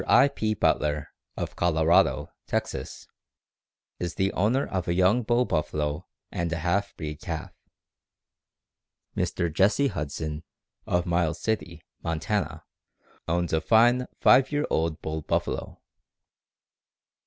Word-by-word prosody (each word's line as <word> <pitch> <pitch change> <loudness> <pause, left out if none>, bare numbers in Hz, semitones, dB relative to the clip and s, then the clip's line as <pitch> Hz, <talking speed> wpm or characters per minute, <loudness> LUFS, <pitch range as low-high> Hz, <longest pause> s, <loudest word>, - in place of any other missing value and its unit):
I. 140 - +6
P. 110 -4 -1
Butler, 75 -5 +1 0.3
of - - -4
Colorado, 80 -1 +3 0.2
Texas_, 65 - -3 0.9
is 85 -1 -3
the 95 +1 0
owner 115 +9 +2
of 95 -3 -3
a 85 - +1
young 95 +7 +4
bull 120 +2 +2
buffalo 75 -3 -2 0.2
and 85 -1 -2
a 85 - -1
half 90 +5 -1
breed 75 -1 -6
calf. - - -5 1.6
Mr. 85 -2 -1
Jesse 105 - +3
Huston, 75 - -4 0.5
of 90 0 +1
Miles 85 -2 0
City, 110 -1 -3 0.2
Montana, 80 -2 -2 0.6
owns 85 0 0
a 80 - +2
fine 120 +8 +4
five 130 +2 +5
year 145 0 +1
old 80 -1 0
bull 80 0 -3
buffalo. - - -2
85 Hz, 120 wpm, -26 LUFS, 80-110 Hz, 1.6 s, I